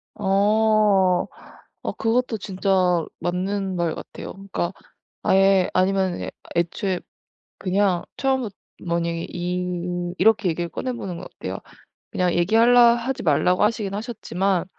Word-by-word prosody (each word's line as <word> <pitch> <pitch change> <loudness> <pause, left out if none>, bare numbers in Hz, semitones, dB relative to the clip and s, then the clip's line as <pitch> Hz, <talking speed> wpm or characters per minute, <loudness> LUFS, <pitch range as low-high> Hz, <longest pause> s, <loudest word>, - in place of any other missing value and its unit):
어 205 -2 +3 0.6
어 - - 0
그것도 230 0 0
진짜 185 -3 +1 0.2
맞는 190 +2 -2
말 170 -2 0
같아요. - - -8
그러니까 195 -2 -4 0.5
아예 195 -1 +4
아니면은 190 -1 +1 0.3
애초에 175 +2 0 0.6
그냥 190 -1 +1
처음부터 260 -6 0 0.3
만약에 170 -1 -1
이 175 0 -3
이렇게 220 -4 +4
얘기를 170 +1 -2
꺼내보는 235 -8 -4
건 - - -8
어때요? - - -6 0.5
그냥 180 -1 +1
얘기할라 235 +7 +5
하지 250 +2 -3
말라고 180 +4 +2
하시긴 210 -2 +1
하셨지만 195 -5 -1
190 Hz, 275 characters per minute, -23 LUFS, 175-215 Hz, 0.6 s, 얘기할라